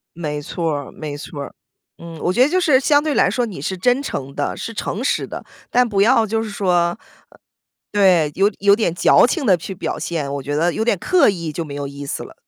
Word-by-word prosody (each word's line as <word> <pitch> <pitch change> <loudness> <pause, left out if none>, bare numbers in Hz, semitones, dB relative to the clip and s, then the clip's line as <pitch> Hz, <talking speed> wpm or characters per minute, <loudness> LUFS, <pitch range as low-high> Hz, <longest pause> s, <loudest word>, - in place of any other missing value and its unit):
没 150 -3 -4
错 165 +2 -2
儿， 145 -2 -5
没 150 -2 -6
错 145 0 -8
儿， - - -8 0.5
嗯。 170 -1 -10
我 180 - +1
觉 245 - +3
得 265 - +5
就 370 +4 +1
是 290 -7 +4
相 290 +1 +3
对 305 -1 -1
来 - - +3
说 245 -1 0
你 195 -9 -8
是 190 +7 -3
真 245 +8 +1
诚 140 - -5
的， 145 - -2
是 230 - -6
诚 215 +1 -3
实 - - 0
的， - - -8 0.3
但 245 0 +3
不 200 -3 +1
要 230 0 +4
就 225 +1 -1
是 220 - -5
说 195 -3 0
呃 170 +3 +1 0.9
对， 180 -7 +3
有 200 +2 +3
有 200 0 +5
点 205 -6 0
矫 175 - +5
情 290 +4 -2
地 185 -4 +5
去 180 +4 -7
表 - - -4
现， 150 -5 -3
我 140 - -4
觉 145 +2 -3
得 170 +3 +2
有 220 - -1
点 225 -5 +1
刻 365 - +3
意 170 -6 -2
就 165 +2 -4
没 145 -2 -8
有 145 0 -4
意 140 +1 -8
思 - - -4
了。 - - -11
185 Hz, 265 characters per minute, -20 LUFS, 155-225 Hz, 0.9 s, 得